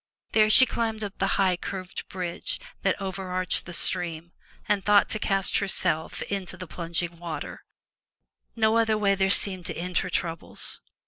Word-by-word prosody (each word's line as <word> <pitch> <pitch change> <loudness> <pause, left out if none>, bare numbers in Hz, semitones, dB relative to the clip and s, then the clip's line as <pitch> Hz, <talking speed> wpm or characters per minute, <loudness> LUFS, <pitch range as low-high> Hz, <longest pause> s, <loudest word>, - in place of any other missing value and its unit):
There 215 -1 +5
she 260 +4 +9
climbed 225 -3 -2
up 200 -1 -6
the 195 - +1
high, 190 -2 +4
curved 185 +1 -6
bridge 180 -2 -4 0.2
that - - +1
over 190 -1 -4
arched 185 -1 -1
the - - -6
stream, 170 -1 -1 0.4
and 200 -2 +1
thought 205 -1 +5
to 215 - -1
cast 195 -2 +1
herself 175 -5 0
into 190 -2 -4
the 185 - -6
plunging 170 0 -3
waters. 170 -2 -5 1.0
No 220 0 +3
other 220 -1 +3
way 200 -2 +3
there 190 0 +2
seemed 190 -2 +2
to - - -4
end 180 +1 0
her - - -3
troubles. 165 -2 -3
190 Hz, 170 wpm, -27 LUFS, 175-205 Hz, 1.0 s, she